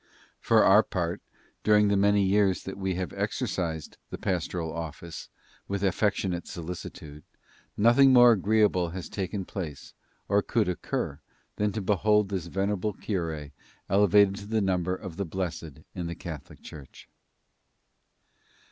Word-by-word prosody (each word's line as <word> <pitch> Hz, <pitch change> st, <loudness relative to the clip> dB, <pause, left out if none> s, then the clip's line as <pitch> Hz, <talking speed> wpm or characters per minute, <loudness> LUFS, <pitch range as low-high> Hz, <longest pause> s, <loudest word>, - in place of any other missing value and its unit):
For -, -, +4 dB
our -, -, +7 dB
part, -, -, -3 dB, 0.4 s
during 105 Hz, -1 st, +4 dB
the 100 Hz, -, +2 dB
many 100 Hz, 0 st, +3 dB
years 95 Hz, -1 st, +2 dB
that 95 Hz, -, -6 dB
we 95 Hz, -1 st, -1 dB
have 90 Hz, -3 st, -4 dB
exercised 80 Hz, -4 st, -3 dB
the -, -, -6 dB
pastoral 85 Hz, -2 st, -2 dB
office 85 Hz, 0 st, -7 dB, 0.4 s
with 100 Hz, 0 st, -3 dB
affectionate 95 Hz, -2 st, 0 dB
solicitude, 80 Hz, -3 st, -8 dB, 0.5 s
nothing 120 Hz, +5 st, +6 dB
more 120 Hz, -1 st, +8 dB
agreeable 105 Hz, -4 st, +2 dB
has 90 Hz, -, -6 dB
taken 95 Hz, 0 st, -4 dB
place, 80 Hz, -9 st, -7 dB, 0.3 s
or 100 Hz, +1 st, +3 dB
could 110 Hz, 0 st, 0 dB
occur, 90 Hz, -, -3 dB, 0.4 s
than 105 Hz, 0 st, +1 dB
to 110 Hz, -, -3 dB
behold 105 Hz, +1 st, +2 dB
this 95 Hz, -4 st, -3 dB
venerable 100 Hz, +3 st, -1 dB
cure 80 Hz, -9 st, -4 dB, 0.4 s
elevated 100 Hz, 0 st, +4 dB
to 100 Hz, 0 st, -9 dB
the 110 Hz, +1 st, 0 dB
number 90 Hz, -2 st, 0 dB
of 90 Hz, -3 st, -9 dB
the 100 Hz, -, -1 dB
blessed 85 Hz, -4 st, -5 dB
in 90 Hz, -2 st, -4 dB
the 85 Hz, -, -5 dB
Catholic 80 Hz, -6 st, -9 dB
Church." 70 Hz, -4 st, -12 dB
95 Hz, 140 wpm, -27 LUFS, 85-105 Hz, 0.5 s, more